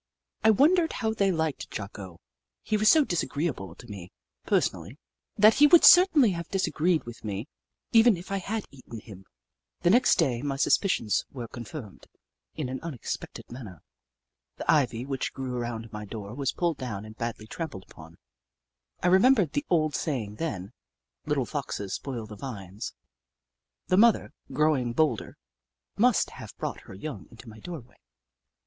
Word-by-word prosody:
I 220 - +6
wondered 320 - +4
how 220 -3 -1
they 200 -3 +2
liked 160 -4 -2
Jocko. 100 -4 -8 0.4
He 215 - -1
was 215 0 +4
so 310 -3 +6
disagreeable 145 - -2
to 120 - -13
me, 95 -5 -9 0.4
personally, 90 - 0 0.4
that 215 +1 +7
he 295 +2 +6
would 335 +3 +7
certainly 325 - +7
have 170 -1 -5
disagreed 180 -3 +1
with 120 0 -10
me, 105 +3 -4 0.4
even 225 -3 +6
if 175 +3 -10
I 195 - 0
had 210 +3 -3
eaten 120 -4 -10
him. 95 -3 -13 0.6
The 175 - +4
next 250 +4 +5
day, 130 -9 +1
my 140 -1 -2
suspicions 135 - +2
were 120 -4 -6
confirmed 120 -1 -9 0.5
in 150 -5 -3
an 130 +1 -4
unexpected 160 -8 -6
manner. 110 - -10 0.7
The - - +1
ivy 125 -6 +1
which 135 -2 -3
grew 130 -2 -4
around 115 -2 -4
my 105 0 -6
door 105 0 -7
was 135 0 -1
pulled 170 -4 -1
down 110 -5 -5
and 110 0 -11
badly 115 -2 -4
trampled 110 - -6
upon. 80 +1 -14 0.9
I - - +3
remembered 190 - +5
the 290 +1 -2
old 155 -4 +2
saying, 110 -9 -3
then: 100 - -4 0.3
" - - -54
Little - - +1
foxes 100 -2 -4
spoil 125 -5 -4
the 105 0 -10
vines." 100 -4 -7 0.9
The 185 - +2
mother, 230 +1 +4 0.2
growing 135 -4 +1
bolder, 140 -5 0 0.6
must 245 +1 +3
have - - -11
brought - - -4
her 95 - -9
young 150 +9 -7
into 115 +1 -14
my 110 0 -11
dooryard. 135 -5 -9
135 Hz, 160 wpm, -27 LUFS, 110-185 Hz, 0.9 s, that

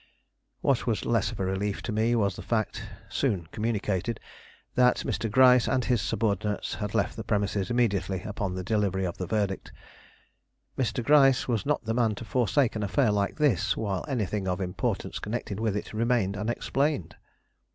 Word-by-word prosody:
What - - +1
was - - 0
less - - +1
of - - -8
a 95 - 0
relief 95 +2 -2
to 115 - -3
me 110 +3 +2
was 100 -5 +1
the - - -7
fact, 110 -2 -1 0.3
soon 90 -5 -1
communicated, 105 -1 -1 0.5
that 125 0 +3
Mr. 115 - -1
Gryce 125 +1 +6
and 130 -2 +1
his 120 -5 +2
subordinates 105 -1 -1
had 105 +1 -4
left 105 - +1
the 110 - -5
premises 100 -1 0
immediately 100 -6 0
upon 100 -3 -3
the 95 - -4
delivery 100 -2 0
of 85 - -4
the 90 - -3
verdict. 100 -1 -1 1.0
Mr. 125 -1 -1
Gryce 135 -2 +5
was 115 -1 -1
not 150 -4 0
the 110 - 0
man 115 -3 +2
to 115 - -8
forsake 125 +1 +1
an 110 - -2
affair 105 +4 +2
like 100 -1 0
this 145 - +2
while 100 -4 -2
anything 105 -7 -2
of 90 0 -1
importance 90 -2 -2
connected 105 -2 -4
with 110 -3 0
it 105 - -6
remained 110 -3 +1
unexplained. 120 - -1
105 Hz, 170 wpm, -27 LUFS, 100-120 Hz, 1.0 s, Gryce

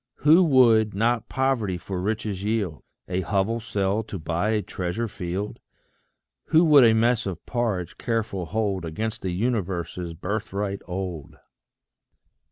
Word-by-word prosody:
Who 165 +5 +7
would 115 - +5
not 115 +2 +1
poverty 130 -9 0
for 90 +2 -5
riches 105 -1 -2
yield? 100 - -1 0.3
A 90 +1 -1
hovel 100 +4 0
sell 105 -3 -1
to 100 - -6
buy 85 +5 -1
a 110 -2 +1
treasure 95 +6 -3
field? 95 +1 -4 0.9
Who 160 +2 +4
would 150 -4 +7
a 110 -1 +6
mess 115 -1 +2
of 90 -4 -6
porridge 110 -8 -2
careful 110 -6 -2
hold 100 -3 -1
Against 110 +8 -4
the 95 - -2
universe's 90 -4 -2
birthright 100 +2 -3
old? 90 -5 -5
105 Hz, 135 wpm, -25 LUFS, 90-115 Hz, 0.9 s, Who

